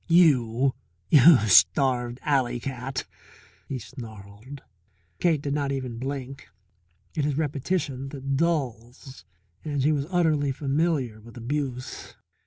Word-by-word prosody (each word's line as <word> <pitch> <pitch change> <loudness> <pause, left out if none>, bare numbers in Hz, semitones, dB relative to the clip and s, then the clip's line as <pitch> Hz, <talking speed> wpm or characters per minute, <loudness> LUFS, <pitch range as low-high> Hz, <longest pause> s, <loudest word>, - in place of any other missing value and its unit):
You 135 -7 +4 0.7
starved 120 +3 +4
alley 130 -4 +1
cat!" 130 0 -4 0.6
he 135 - -3
snarled. 110 +1 -11 0.6
Cake 160 -5 +1
did 140 - -2
not 140 -1 -1
even 130 -4 -4
blink. 135 0 -6 0.6
It 150 - -1
is 145 -1 -1
repetition 145 -2 -2
that 135 -1 -3
dulls, 135 -5 -3 0.4
and 145 -3 -2
she 150 - +3
was 145 -1 -1
utterly 155 -6 +2
familiar 135 -5 -1
with 115 +2 -14
abuse. 130 +1 -4
135 Hz, 110 wpm, -26 LUFS, 125-145 Hz, 0.7 s, You